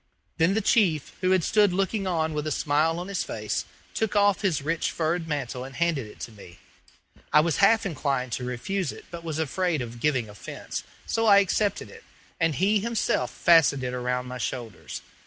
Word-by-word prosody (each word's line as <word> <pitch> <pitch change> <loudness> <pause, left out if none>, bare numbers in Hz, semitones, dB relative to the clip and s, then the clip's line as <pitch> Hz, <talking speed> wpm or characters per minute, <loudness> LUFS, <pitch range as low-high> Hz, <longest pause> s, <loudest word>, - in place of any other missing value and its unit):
Then 175 +5 +3
the 220 - +2
chief, 180 - +2
who 185 - +2
had 185 -2 +3
stood 205 +1 +4
looking 195 +1 0
on 160 -3 0
with 150 0 -2
a - - -1
smile 155 +3 +1
on 175 +1 -5
his 200 -1 -2
face - - -3 0.3
took 220 -1 -1
off 205 -1 +4
his 170 -8 0
rich 165 +2 0
furred 165 +1 -1
mantle 135 -5 -3
and 135 +1 -9
handed 165 -8 0
it 105 - -14
to - - -6
me. 100 -5 -14 0.7
I 150 - +7
was 160 -1 0
half 220 +2 +4
inclined 135 -7 -1
to 125 - -3
refuse 145 +10 -2
it, - - -12
but 170 -1 -7
was 160 -2 -3
afraid 160 +2 0
of 120 -1 -6
giving 130 -4 +1
offence, 100 -3 -7 0.2
so 225 0 0
I 200 -1 +8
accepted 200 +1 +1
it, 460 -1 -14 0.4
and 165 -3 +2
he 200 +6 +3
himself 235 +2 0
fastened 160 -6 +4
it 125 0 -2
around 125 0 -1
my 125 0 -6
shoulders. 115 -4 -5
160 Hz, 195 wpm, -26 LUFS, 130-195 Hz, 0.7 s, I